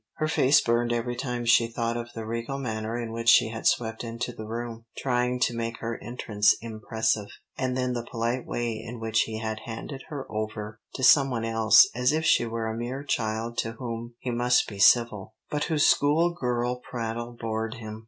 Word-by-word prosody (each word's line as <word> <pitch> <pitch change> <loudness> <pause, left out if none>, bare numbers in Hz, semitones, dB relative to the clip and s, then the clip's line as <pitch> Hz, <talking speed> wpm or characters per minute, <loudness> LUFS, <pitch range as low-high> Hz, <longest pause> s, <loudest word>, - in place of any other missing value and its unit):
Her 155 - -1
face 140 -2 +4
burned 120 0 +1
every 120 +1 -1
time 125 -1 -3
she 115 0 +5
thought 115 0 -2
of 120 0 -4
the 115 -1 -5
regal 115 +4 -3
manner 110 -3 -3
in 115 -2 -4
which 115 +1 0
she 115 - +6
had 115 0 -2
swept 115 -1 0
into 115 +1 -4
the 110 -2 -8
room, 115 0 -5
trying 125 -1 0
to 120 - +2
make 115 0 -3
her 115 0 -4
entrance 105 -2 +2
impressive, 110 -1 -1 0.3
and 130 0 -1
then 125 -1 0
the 120 -1 -4
polite 120 +2 -1
way 115 -2 -2
in 115 +1 -7
which 115 0 0
he 110 -1 -4
had 110 0 -3
handed 130 +4 -7
her 140 -3 -6
over 105 0 -5 0.2
to 130 - -4
some 135 +2 +7
one 115 -3 -2
else 115 -1 +6
as 125 +1 +2
if 160 +1 0
she 120 - +4
were 115 0 -3
a 110 0 -2
mere 125 +4 -4
child 115 -3 -2
to 115 - -2
whom 115 0 -6
he 125 - -4
must 120 +1 +2
be 100 -2 -8
civil, 110 -2 +4 0.2
but 150 0 0
whose 155 -3 +2
school 160 +4 +3
girl 125 -5 -1
prattle 120 -1 -5
bored 110 0 -3
him. 110 -2 -8
115 Hz, 205 wpm, -27 LUFS, 115-125 Hz, 0.3 s, some